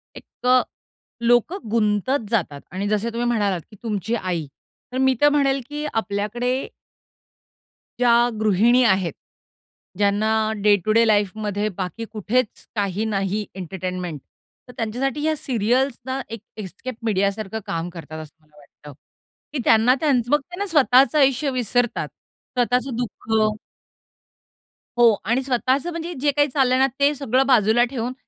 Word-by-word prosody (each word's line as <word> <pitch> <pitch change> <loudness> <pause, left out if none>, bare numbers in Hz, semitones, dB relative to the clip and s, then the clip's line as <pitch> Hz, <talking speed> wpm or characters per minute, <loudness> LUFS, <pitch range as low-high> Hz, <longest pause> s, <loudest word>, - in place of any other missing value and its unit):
एक 250 - -9
अ, 255 0 +6 0.6
लोकं 240 - +2
गुंतत 220 +3 +1
जातात 155 -10 -1
आणि 195 +2 -3
जसे 215 +2 0
तुम्ही 240 +1 -1
म्हणालात, 205 -6 0
की - - -13
तुमची 220 0 -2
आई, 180 -7 -2 0.5
तर - - -2
मी 265 0 +3
तर 290 - +7
म्हणेल, 275 -2 +2
की 295 +1 -4
आपल्याकडे 225 +5 -2 1.3
ज्या 240 0 +4
गृहिणी 220 +4 +4
आहेत. 190 - +2 0.8
ज्यांना 205 +2 +2 0.3
डे-टू-डे 215 +3 +4
लाईफमध्ये 210 0 0
बाकी 190 +4 -4
कुठेच 220 +2 -1
काही 205 +1 -1
नाही 205 0 -1
एंटरटेनमेंट 180 -3 -5 0.5
तर 250 - -12
त्यांच्यासाठी 255 +6 -2
या 315 0 +1
सीरियल्स 250 0 0
ना 265 +1 -3
एक 230 -2 -7 0.2
एस्केप 215 +5 -7
मीडिया 200 -3 +1
सारखं 215 +1 -5
काम 175 -4 -3
करतात 160 -2 -9
असं 155 - -15
मला 150 -1 -27
वाटतं, 145 0 -15 0.6
की 295 - -2
त्यांना 225 +3 +5
त्यांचं 255 -5 +1
मग 295 - +5
त्या 355 +6 -12
ना 405 - 0
स्वतःचं 275 -2 +4
आयुष्य 275 +1 +3
विसरतात. 245 -1 0 0.5
स्वतःचं 250 +1 +1
दुःख 235 -2 -6 1.7
हो 235 -2 +6
आणि 240 +4 +1
स्वतःचं 260 +5 0
म्हणजे 335 +1 -5
जे 290 0 +3
काही 290 +1 +2
चाललं 265 -2 +1
आहे 260 - +2
ना - - +5
ते 285 +1 +4
सगळं 265 -1 +1
बाजूला 235 -2 +4
ठेवून, 250 -1 -3
230 Hz, 140 wpm, -22 LUFS, 205-260 Hz, 1.7 s, तर